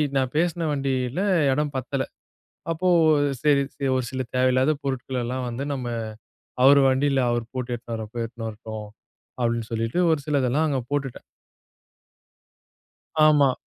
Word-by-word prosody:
நான் 130 -1 +1
பேசுன 170 0 +1
வண்டில 135 +2 -1 0.3
இடம் 150 +1 0
பத்தல. 130 +1 -2 0.7
அப்போ 175 +3 -1 0.5
சரி 145 -2 +4
சரி, 140 -1 -3
ஒரு 130 -1 0
சில 130 0 -2
தேவையில்லாத 130 +3 +3
பொருட்கள் 130 -1 -2
எல்லாம் 125 +1 -3
வந்து 120 +4 -4
நம்ம 130 -3 -4 0.8
அவரு 140 +1 +8
வண்டில 135 +1 +2
அவரு 120 -1 0
போட்டு 125 -1 -3
எட்டுன்னு 115 -1 -6
வரப்போ 110 +2 -7
எட்டுன்னு 115 -1 -6
வரட்டும், 110 -1 -7 0.5
அப்டின்னு 115 -1 -1
சொல்லிட்டு 115 +7 -1
ஒரு 150 - +1
சிலதெல்லாம் 145 +1 +1
அங்க 135 -3 0
போட்டுட்டேன். 140 -3 -3 2.1
ஆமா. 145 -3 +5
130 Hz, 130 wpm, -24 LUFS, 120-140 Hz, 2.1 s, அவரு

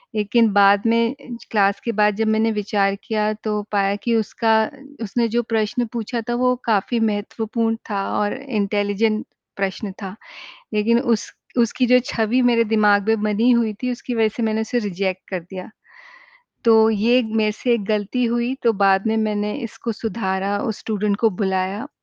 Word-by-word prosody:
लेकिन 215 +1 +2
बाद 200 0 +5
में 230 +2 +2
ज 240 -3 -10
क्लास 200 -2 +2
के 235 - 0
बाद 210 -1 +2
जब 220 +1 0
मैंने 220 +1 +2
विचार 200 -2 0
किया 215 -1 0
तो 210 -1 -1
पाया 200 -1 +1
की 235 -1 +1
उसका 225 +1 +1 0.5
उसने 230 +3 0
जो 240 - +2
प्रश्न 225 +1 -1
पूछा 235 0 -3
था - - +1
वो 250 +1 +2
काफ़ी 225 +2 +1
महत्वपूर्ण 225 +1 -1
था 200 -2 -1 0.2
और 205 0 0
इंटेलिजेंट 215 -3 0 0.3
प्रश्न 195 +1 -3
था। 190 0 -6 0.6
लेकिन 230 +3 +3
उस 230 -5 0 0.3
उसकी 245 +2 +2
जो 250 +1 +6
छवि 230 +3 +1
मेरे 230 -1 +3
दिमाग 210 -2 +3
में 220 -1 +2
बनी 215 +3 +2
हुई 230 -2 +2
थी 250 0 0
उसकी 245 0 -5
वजह 225 -1 +3
से 235 - -2
मैंने 220 0 0
उसे 230 +2 -1
रिजेक्ट 190 0 -3
कर 185 -2 -2
दिया। 185 +4 -9 1.0
तो 220 -1 +6
ये 225 +4 +3
मेरे 220 -1 0
से 240 +3 0
एक 230 -3 0
गलती 215 +4 0
हुई 240 +2 -1
तो 230 - +4
बाद 195 0 +3
में 220 0 +1
मैंने 210 -1 -1
इसको 225 +1 -5
सुधारा, 200 -3 -2
उस 220 -1 -3
स्टूडेंट 210 -2 -1
को 225 - +4
बुलाया 190 +5 -1
220 Hz, 175 wpm, -21 LUFS, 205-230 Hz, 1.0 s, जो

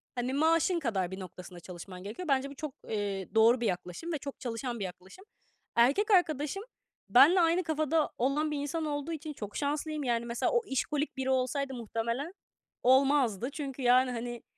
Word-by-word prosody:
Hani, 250 +1 -2
maaşın 330 +4 +3
kadar 195 - -1
bir 190 - -6
noktasında 180 -1 -9
çalışman 180 +1 -9
gerekiyor." 225 - -6
Bence 275 -1 +1
bu 280 - -10
çok, 300 -1 -5 0.2
eee, 200 -2 -3
doğru 230 +2 +5
bir - - 0
yaklaşım 180 - -4
ve - - 0
çok 280 -1 -8
çalışan 240 -1 -4
bir 200 - -2
yaklaşım. 185 - -11 0.5
Erkek 280 - +4
arkadaşım 325 0 +2 0.5
benle 280 - +7
aynı 335 +2 +3
kafada 315 -1 +1
olan 285 +5 +1
bir 300 - -2
insan 290 +3 -2
olduğu 290 +1 -3
için 310 -1 -5
çok 210 -7 -8
şanslıyım. 300 +1 -2
Yani, 235 -2 0
mesela, 235 0 -1
o 480 - +3
işkolik 290 0 -2
biri 265 0 -1
olsaydı 265 +1 0
muhtemelen 235 - -3 0.5
olmazdı. 260 -4 +3
Çünkü 275 -2 -5
yani 250 +1 +4
hani, 240 0 -5
265 Hz, 175 wpm, -30 LUFS, 230-300 Hz, 0.5 s, benle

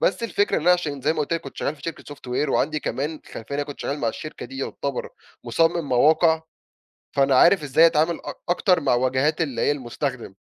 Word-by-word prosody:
بس - - +1
الفكرة 205 -2 +1
إن - - -1
أنا 180 +2 +5
عشان 155 -6 -1
زي 150 +4 +1
ما - - -6
قلت 150 - -2
لك 165 - 0
كنت 135 - -11
شغال 150 - -2
في - - -19
شركة 155 -3 -6
software 130 +2 -3
وعندي 150 +2 0
كمان 150 +4 -3
خلفية - - -8
لإن - - -2
أنا - - +1
كنت 145 -1 -9
شغال 145 - -3
مع 120 - 0
الشركة 155 +7 -7
دي 135 - -10
يعتبر 140 +1 -4 0.4
مصمِّم 165 +5 +1
مواقع، 160 +5 +4 0.7
فأنا 135 -1 +3
عارف 170 +4 +5
إزاي 145 +4 +5
أتعامل 165 +1 +2
أ - - -4 0.2
اكتر 180 0 +3
مع 135 -3 +2
واجهات 130 +6 +1
اللي 140 -7 -2
هي - - +3
المستخدم، 130 -4 -4
145 Hz, 220 wpm, -23 LUFS, 135-165 Hz, 0.7 s, أنا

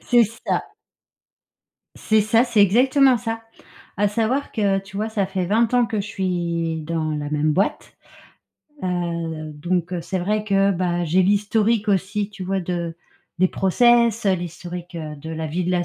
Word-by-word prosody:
C'est 240 -2 +4 0.2
ça. - - +1 1.3
C'est 220 0 +2
ça, 225 +3 +3
c'est 235 -4 +2
exactement 255 +6 +5
ça. 225 -1 -4 0.5
À 205 0 +2
savoir 230 +7 -1
que, 200 -3 +1
tu 195 0 -10
vois, 215 +2 -1
ça 205 -3 -1
fait 190 -1 -2
20 225 +4 +2
ans 245 -1 +4
que 215 -1 -2
je 200 - -5
suis 170 -4 -2
dans 160 0 -2
la 150 -1 -3
même 150 0 +1
boîte. 195 +6 -1 0.9
Heu, 170 -3 -3
donc, 175 +3 -2
heu, 175 - -2
c'est 190 +3 -3
vrai 210 +4 -1
que, 195 -1 +3
bah, 175 -2 0
j'ai 175 +3 +3
l'historique 210 +3 +1
aussi, 200 +1 0
tu 195 -3 -8
vois, 190 +1 -1
de 170 -2 -4 0.4
des 185 +1 +4
process, 235 +4 +3
heu, 195 - +4
l'historique, 175 0 -7
heu, 155 -2 -5
de 145 +3 -10
la 160 0 -4
vie 170 +4 -2
de 180 - -1
la 180 -1 +1
190 Hz, 175 wpm, -22 LUFS, 170-215 Hz, 1.3 s, exactement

